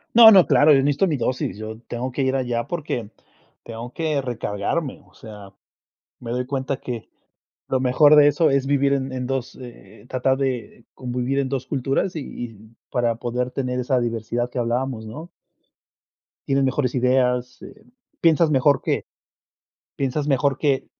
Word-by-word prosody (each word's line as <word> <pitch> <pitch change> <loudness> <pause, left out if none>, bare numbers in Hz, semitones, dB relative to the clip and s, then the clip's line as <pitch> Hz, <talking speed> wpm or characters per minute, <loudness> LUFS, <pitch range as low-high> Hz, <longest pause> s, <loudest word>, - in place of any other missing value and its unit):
No, 225 -1 +10
no, 190 -4 +8
claro, 145 +2 +5
yo 135 - +5
necesito 145 +7 +2
mi 160 -5 0
dosis, 125 -5 -2
yo 110 +1 -7
tengo 125 +2 -4
que 135 +2 -2
ir 130 0 +1
allá 120 -3 -1
porque, 135 -10 -4 0.5
tengo 115 +2 -8
que 155 -2 -1
recargarme, 125 +3 -3
o - - -26
sea, 105 -3 -11 0.7
me 115 - -7
doy 125 +1 -1
cuenta 135 +1 -3
que 120 -3 -7 0.6
lo 130 - 0
mejor 145 +4 +5
de 145 -1 +7
eso 145 +3 +2
es 135 -1 +1
vivir 140 0 +2
en 135 -1 -1
en 125 -1 -3
2, 135 -1 -3
eh, 115 -5 -13
tratar 130 +1 +1
de 130 -4 -3
convivir 125 +1 -3
en 135 -1 0
2, 130 -1 -3
culturas 135 +6 -1
y - - -2 0.2
y 110 -1 -13
para 120 -2 +1
poder 125 +2 -3
tener 125 -1 -2
esa 125 +1 +1
diversidad 120 +1 -2
que 125 - -5
hablábamos, 120 -1 -2
¿no? 150 +10 -8 1.2
Tienes 135 0 +2
mejores 130 -1 0
ideas, 125 0 +1
eh, 215 +1 -13 0.4
piensas 165 -1 +4
mejor 140 0 +3
que - - -1 0.9
piensas 140 +2 -1
mejor 140 -1 +1
que 140 -3 0
130 Hz, 165 wpm, -22 LUFS, 120-140 Hz, 1.2 s, No